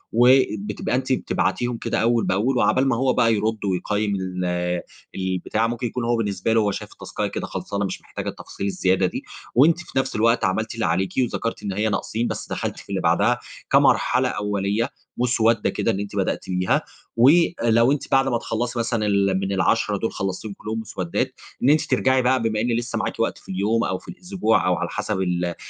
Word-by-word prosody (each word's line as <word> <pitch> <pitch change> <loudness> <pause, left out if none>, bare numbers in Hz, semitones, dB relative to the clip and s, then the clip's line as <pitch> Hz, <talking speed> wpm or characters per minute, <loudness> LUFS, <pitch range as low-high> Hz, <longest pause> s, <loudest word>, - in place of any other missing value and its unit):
وبتبقى 115 -4 +3
أنتِ 130 +1 0
بتبعتيهم 120 -1 -1
كده - - -2
أول 115 0 +2
بأول، 115 +8 +1
وعقبال 130 +2 +3
ما 130 - +2
هو 130 +2 +2
بقى 115 -2 +3
يرد 110 0 -1
ويقيم 100 +2 0
ال 90 -2 -2 0.3
البتاع، 95 +4 -1
ممكن 120 +1 -2
يكون 120 +2 -4
هو 120 0 +2
بالنسبة 105 0 -1
له 110 -2 +3
شايف - - -6
التسكاية - - -4
كده - - -4
خلصانة، 100 0 -3
مش 95 - -5
محتاجة - - -6
التفاصيل - - -7
الزيادة 95 -1 +1
دي، 90 - -3 0.3
وأنتِ 160 +7 +5
في 175 - -7
نفس 130 0 -2
الوقت 115 +1 +3
عملتِ 110 +4 -1
اللي 115 -2 -2
عليكِ 95 +3 0
وذكرتِ 120 -2 -1
إن 100 - -2
هي 105 +3 0
ناقصين، 110 +3 -1
بس - - -5
دخلتِ - - -3
في - - -15
اللي - - -1
بعدها - - +2 0.3
كمرحلة - - +4
أولية، 105 +3 -1 0.3
مسودة 115 -2 +2
كده - - 0
أن 95 - -2
أنتِ 100 0 -5
بدأتِ 95 -1 -1
بيها. 90 0 +1 0.4
ولو 120 -4 +4
أنتِ 145 - -2
بعد 135 0 +4
ما 120 -3 +1
تخلّصِ 120 +1 -3
مثلًا 115 -2 0
ال 100 -2 +2
من 95 0 -2
ال10 95 - +1
دول - - -2
خلصتيهم 95 +2 -4
كلهم 110 +1 -4
مسودات، 95 -5 -3 0.3
إن 130 - +5
أنتِ 150 +1 +5
ترجعي 130 0 +2
بقى، 130 0 +2
بما 110 -2 0
إن 120 +2 0
لسه 120 0 -2
معاكِ 105 - -3
وقت - - 0
في - - -19
اليوم 105 +5 +1
أو 95 - -1
في - - -18
الأسبوع 180 - 0
أو 90 - +3
على 85 0 -3
حسب 105 -2 -2
ال 90 -1 -1
110 Hz, 195 wpm, -23 LUFS, 95-120 Hz, 0.4 s, وأنتِ